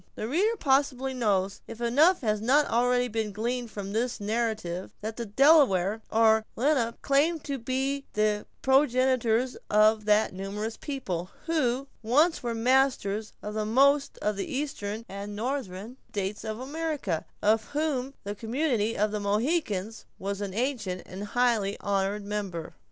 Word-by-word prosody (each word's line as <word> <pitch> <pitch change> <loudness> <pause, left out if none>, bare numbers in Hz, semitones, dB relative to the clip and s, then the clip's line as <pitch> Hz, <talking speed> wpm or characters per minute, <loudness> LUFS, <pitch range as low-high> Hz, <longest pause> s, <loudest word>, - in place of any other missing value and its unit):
The 215 - -4
reader 405 - +1
probably 270 -3 +1
knows, 200 -6 0
if 230 - -9
enough 290 +10 +4
has 215 -3 0
not 280 +6 +4
already 245 +1 +2
been 220 -2 -2
gleaned 235 +3 -2
form 200 -2 -6
this 235 +2 -1
narrative, 210 -4 -2
that 220 +1 -4
the 235 -1 -5
Delaware, 220 - +4
or 220 0 +4
Lenape, 245 -3 +1
claimed 300 +3 +2
to 280 -2 -3
be 265 +3 -2
the 210 0 +1 0.2
progenitors 255 -3 +2
of 215 0 +4
that 210 0 +3
numerous 205 +4 -4
people, 190 - -4 0.2
who 275 -5 0
once 295 +9 +3
were 235 -2 -2
masters 225 -4 +1
of 210 - -5
most 280 +5 +3
of 210 -1 0
the 200 - -4
eastern 230 -6 -3
and 200 +1 -6
northern 230 -2 -4
states 200 +1 -3
of 220 0 -4
America, 285 - -2 0.2
of 215 +1 +3
whom 280 -3 -2
the 205 - -4
community 230 0 -1
of 210 +1 +1
the 210 - -2
Mohicans 215 - -1
was 200 +1 -4
an 195 -2 -4
ancient 225 -7 -2
and 195 +3 -7
highly 225 -3 +1
honored 200 +1 -1
member. 200 -5 -4
225 Hz, 145 wpm, -28 LUFS, 205-265 Hz, 0.2 s, enough